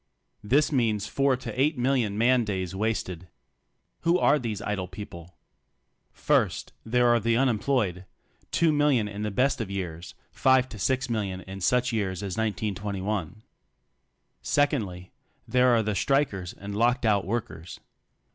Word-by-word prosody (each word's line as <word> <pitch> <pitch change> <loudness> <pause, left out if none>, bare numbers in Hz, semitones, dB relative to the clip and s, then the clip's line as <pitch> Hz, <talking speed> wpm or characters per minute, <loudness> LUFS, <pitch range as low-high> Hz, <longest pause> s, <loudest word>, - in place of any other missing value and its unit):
This 140 +9 +2
means 110 -7 +1
four 135 +1 +1
to 130 +1 -4
eight 150 +2 +2
million 120 -5 +1
man 120 +2 +4
days 95 -4 -3
wasted. 95 -4 -2 0.7
Who 170 +1 +2
are 150 -4 +3
these 110 -6 -3
idle 105 -3 -3
people? 90 -2 -10 0.8
First, - - 0
there 125 +2 +2
are 120 0 +4
the 115 +1 +1
unemployed 115 -7 0 0.2
— - - -37
two 165 -2 +4
million 145 -7 +2
in 105 0 -6
the 105 - -1
best 130 +5 +1
of 105 - -4
years, 90 -3 -5 0.2
five 130 -1 +3
to 110 - -9
six 130 +6 0
million 100 -6 -2
in 95 +2 -9
such 125 +5 +2
years 100 -3 -2
as 95 -2 -4
1921. 105 -2 -3 1.0
Secondly, 100 - 0 0.4
there 125 0 +3
are 120 -2 +4
the 105 0 -1
strikers 100 - 0
and 100 +1 -7
locked 120 +3 +2
out 100 -3 +3
workers. 95 -5 -5
110 Hz, 145 wpm, -26 LUFS, 95-125 Hz, 1.0 s, man